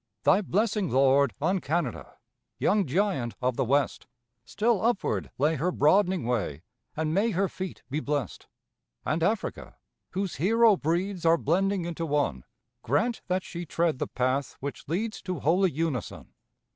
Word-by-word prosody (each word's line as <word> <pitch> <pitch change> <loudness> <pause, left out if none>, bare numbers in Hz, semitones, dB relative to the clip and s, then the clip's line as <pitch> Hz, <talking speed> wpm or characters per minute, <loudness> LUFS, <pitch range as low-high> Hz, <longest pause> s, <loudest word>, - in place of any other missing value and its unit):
Thy - - +5
blessing, 205 -1 0
Lord, 135 +1 +3
on 180 +6 +1
Canada, 170 +4 -2 0.4
Young 205 -5 +2
giant 160 - 0
of 125 -1 0
the 135 - +1
West, 140 +3 0 0.4
Still 215 - +1
upward 230 -3 0
lay 150 +4 +2
her 175 +6 0
broadening 185 +4 +3
way, 100 - -2 0.3
And 155 0 0
may 205 +6 +2
her 195 -1 +1
feet 185 0 -7
be 145 +4 -2
blessed! 145 - -3 0.6
And 160 +2 0
Africa, 210 +6 -2 0.4
whose 190 -1 -2
hero 225 +6 +5
breeds 175 +3 -1
Are 165 0 +5
blending 185 +4 +1
into 165 -1 -3
one, 140 - 0 0.4
Grant 225 - 0
that 185 0 0
she 175 0 -6
tread 165 -3 0
the - - -1
path 130 +2 -1
which 140 +1 -6
leads 215 +8 -2
To 180 -4 -4
holy 180 +7 +3
unison. 155 -6 -4
170 Hz, 150 wpm, -27 LUFS, 140-195 Hz, 0.6 s, Thy